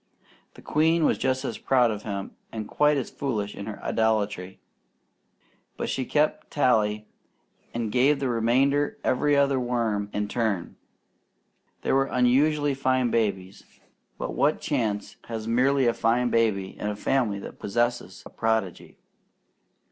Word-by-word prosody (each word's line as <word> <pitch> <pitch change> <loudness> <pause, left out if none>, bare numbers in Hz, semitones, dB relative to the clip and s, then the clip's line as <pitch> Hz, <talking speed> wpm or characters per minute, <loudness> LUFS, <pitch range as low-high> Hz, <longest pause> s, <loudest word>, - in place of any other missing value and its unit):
The - - -14
queen 160 +1 +2
was - - +2
just 130 +1 0
as 115 - -4
proud 125 -3 +3
of 105 -1 -5
him 100 -2 -5 0.2
and 110 -2 -5
quite 150 +4 +2
as 130 - -3
foolish 105 -7 -3
in 100 - -8
her 105 - -6
idolatry, 105 -4 -1 1.2
but - - -3
she 130 - -2
kept 150 +4 0
tally 110 -6 +1 0.7
and 115 -2 -3
gave 135 +4 +3
the 135 - -1
remainder 130 +6 +1
every 145 +3 +2
other 140 -1 +3
worm 115 -5 -1
in 105 0 -2
turn. 105 -6 -2 1.1
They - - 0
were 135 0 +3
unusually 140 +4 +2
fine 130 -2 +1
babies, 100 -4 -1 0.5
but - - -4
what 150 +2 +2
chance 110 -8 -2
has 115 -1 -5
merely 130 +3 +3
a 120 - +3
fine 120 +2 +1
baby 105 -5 +1
in - - -3
a 105 - -2
family 115 -2 0
that 100 - -9
possesses 120 +4 -2
a - - -11
prodigy? 110 -5 -2
120 Hz, 145 wpm, -26 LUFS, 105-135 Hz, 1.2 s, proud